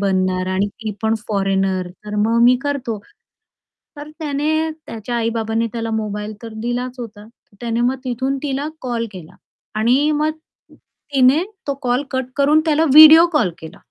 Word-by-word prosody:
बनणार 185 -2 0
आणि 195 +2 +1
ती 215 +1 -7
पण 220 0 +2
फॉरेनर, 195 -2 0 0.2
तर 210 0 -6
मग 230 +1 +2
मी 250 +1 +6
करतो." 265 -7 -3 1.0
तर 295 +1 -8
त्याने 310 +1 -1 0.2
त्याच्या 230 +2 -5
आई-बाबांनी 225 0 -1
त्याला 230 -1 -3
मोबाईल 210 -1 -3
तर 225 -1 -8
दिलाच 245 +1 -3
होता. 210 -3 -8
तर 225 -2 -27
त्याने 235 0 -1
मग 250 +2 +1
तिथून 260 +2 -2
तिला 280 +1 -2
कॉल 240 -2 -2
केला 180 -5 -11 0.4
आणि 260 +7 +3
मग 305 +1 +1 0.8
तिने 270 +5 +4 0.2
तो 280 - 0
कॉल 250 +2 +1
कट 260 -1 -1
करून 295 +2 +4
त्याला 315 +1 +2
व्हिडिओ 315 +2 +10
कॉल 235 -12 +2
केला. 160 - -11
240 Hz, 155 wpm, -19 LUFS, 215-280 Hz, 1.0 s, व्हिडिओ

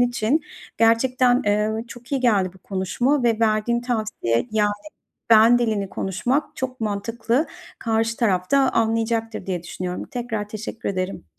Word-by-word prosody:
için. 245 +4 +2 0.4
Gerçekten, 245 +2 +3
eee, 210 +2 0
çok 240 +3 -11
iyi 270 - +1
geldi 205 -7 +2
bu - - -16
konuşma 200 +10 0
ve 230 -2 +2
verdiğin 225 +2 +2
tavsiye 215 - -1
yani, 210 -1 +2 0.6
ben 230 +2 +7
dilini 215 -5 0
konuşmak 250 - -1
çok 260 0 -4
mantıklı. 230 +6 -1 0.3
Karşı 225 0 0
taraf 185 -5 0
da 280 - +5 0.2
anlayacaktır 225 -1 0
diye 180 -3 -3
düşünüyorum. 180 +1 -5
Tekrar 225 -4 -3
teşekkür 220 +1 -5
ederim. 185 - -3
225 Hz, 135 wpm, -23 LUFS, 205-240 Hz, 0.6 s, ben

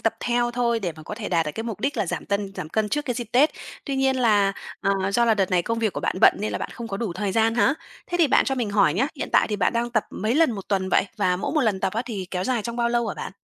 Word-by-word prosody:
tập 225 0 +1
theo 240 0 +1
thôi 235 -1 0
để 175 -4 -2
mà 155 - -11
có 210 - -6
thể 220 -1 -5
đạt 165 -3 +1
được 150 - -3
cái 225 - -3
mục 220 -3 -5
đích 275 +1 -1
là 210 -4 0
giảm - - -4
tân 200 -1 -2
giảm 155 - -5
cân 215 +5 0
trước 295 +4 -1
cái 245 -5 -2
dịp 240 -1 -3
Tết. 280 +5 +5 0.3
Tuy 275 -2 -2
nhiên 265 0 +2
là, 205 -5 +3 0.3
ờ, 195 -1 0
do 235 +3 +3
là 225 -2 +4
đợt 195 -3 0
này 180 -2 +3
công 230 +4 -2
việc 220 -3 0
của - - -4
bạn - - -1
bận - - +7
nên 210 - -2
là - - -2
bạn - - -5
không 235 -1 -7
có 195 - -3
đủ 205 -5 -3
thời 195 +2 -2
gian 225 +1 +2
hả? 265 +4 +3 0.3
Thế 350 - -2
thì 335 - +5
bạn 280 - +4
cho 270 - 0
mình 240 -5 -2
hỏi 200 -6 +3
nhá, 255 +8 +2
hiện - - -4
tại - - +5
thì 210 - -1
bạn 185 +2 +1
đang 235 +1 -1
tập 220 -3 +1
mấy 220 +3 -1
lần 320 -3 +4
1 195 -3 -7
tuần 190 -2 0
vậy? - - +3
Và 180 -3 +1
mỗi 200 - -3
1 305 - +2
lần 210 -6 +1
tập - - 0
á 225 +3 -1
thì 200 -6 -4
kéo 185 0 -2
dài 250 -4 0
trong 235 +2 -5
bao 235 -1 +1
lâu 235 -1 +1
hả - - -3
bạn? - - -6
220 Hz, 335 wpm, -24 LUFS, 195-240 Hz, 0.3 s, bận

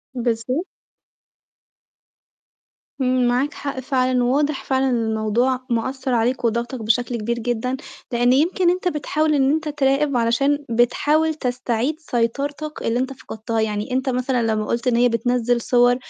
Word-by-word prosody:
بالض 230 -2 -1 2.5
إمم، 255 -1 +2
معاك 255 +5 +1
حق 280 -2 -5
فعلًا، 255 -2 +1
وواضح 285 +3 +1
فعلًا 265 0 +1
إن 235 -2 +1
الموضوع 220 +4 +1
مأثّر 260 +3 -1
عليك 240 +2 +1
وضاغطك 235 +2 -1
بشكل 240 +2 +1
كبير 235 +2 -2
جدًا، 245 +2 -2 0.3
لإن 245 +1 +3
يمكن 345 +6 +3
أنت 360 0 0
بتحاول 310 -1 0
إن 270 0 +3
أنت 310 0 -1
تراقب 280 -1 +1
علشان 275 +5 +1
بتحاول 295 +7 +2
تستعيد 250 0 -1
سيطرتك 285 +3 -2
اللي 230 +2 0
أنت 260 +1 -2
فقدتها، 225 -3 -4
يعني 215 +3 -2
أنت 260 +1 0
مثلًا 250 -1 0
لمّا 215 0 -1
قُلت 235 +3 -2
إن 240 - +3
هي 245 +1 +4
بتنزّل 240 +1 +1
صور 245 +1 +4
250 Hz, 140 wpm, -21 LUFS, 235-275 Hz, 2.5 s, هي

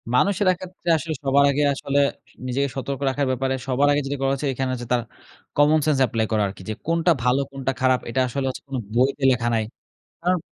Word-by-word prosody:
মানুষের 200 +7 +2
এক্ষেত্রে 180 -1 -6
আসলে 160 +1 -4
সবার 140 +1 +4
আগে 145 +2 +1
আসলে 140 +1 -1 0.5
নিজেকে 140 +3 0
সতর্ক 135 0 -3
রাখার 140 +1 -1
ব্যাপারে 130 +1 0
সবার 135 +2 +2
আগে 145 0 +2
যেটা 140 +1 -3
করা 135 0 +2
হচ্ছে 140 +1 -2
এইখানে 130 0 -2
হচ্ছে 120 -1 -5
তার 120 - +2 0.6
কমনসেন্স 150 0 +4
এপ্লাই 110 0 0
করা 110 -1 +2
আরকি। 95 0 -9
যে - - -1
কোনটা 170 +1 +3
ভালো? 125 +2 +3
কোনটা 135 -1 -2
খারাপ? 130 -1 +3
এটা 115 - -1
আসলে 135 +2 -3
হচ্ছে 130 - -6
কোনো 135 -2 -3 0.2
বইতে 135 +3 +2
লেখা 120 -2 0
নাই। 110 - +1 0.6
কারণ 180 +1 +1
135 Hz, 200 wpm, -23 LUFS, 125-145 Hz, 0.6 s, সবার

